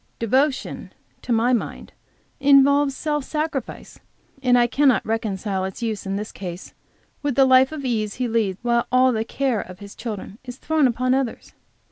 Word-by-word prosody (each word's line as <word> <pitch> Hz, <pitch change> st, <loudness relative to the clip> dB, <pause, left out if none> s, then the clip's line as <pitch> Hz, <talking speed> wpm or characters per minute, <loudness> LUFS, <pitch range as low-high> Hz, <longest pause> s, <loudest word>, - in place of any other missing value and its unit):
"Devotion," 260 Hz, +5 st, 0 dB, 0.3 s
to -, -, -6 dB
my 235 Hz, +2 st, +3 dB
mind, 240 Hz, -, -3 dB, 0.5 s
involves 280 Hz, 0 st, +4 dB
self 295 Hz, -2 st, -1 dB
sacrifice, 300 Hz, -3 st, -4 dB, 0.4 s
and 250 Hz, -2 st, +4 dB
I 240 Hz, -, +5 dB
cannot 270 Hz, +1 st, +2 dB
reconcile 205 Hz, -3 st, -2 dB
its 190 Hz, +5 st, -5 dB
use, 220 Hz, -3 st, -3 dB
in 195 Hz, -, -2 dB
this 210 Hz, +2 st, -5 dB
case, 180 Hz, -2 st, -8 dB, 0.5 s
with 285 Hz, -3 st, -1 dB
the 270 Hz, -, +5 dB
life 260 Hz, +1 st, +5 dB
of 300 Hz, -3 st, -6 dB
ease 215 Hz, -4 st, -1 dB
he 250 Hz, -1 st, -2 dB
leads, 220 Hz, -5 st, 0 dB
while 235 Hz, -1 st, +1 dB
all 255 Hz, 0 st, +4 dB
the 220 Hz, -2 st, -1 dB
care 255 Hz, -1 st, -1 dB
of 185 Hz, 0 st, -10 dB
his 200 Hz, +1 st, -11 dB
children 215 Hz, -2 st, -7 dB
is 250 Hz, -1 st, -9 dB
thrown 310 Hz, -2 st, +2 dB
upon 255 Hz, +1 st, 0 dB
others. 265 Hz, -3 st, -3 dB
245 Hz, 170 wpm, -22 LUFS, 220-270 Hz, 0.5 s, I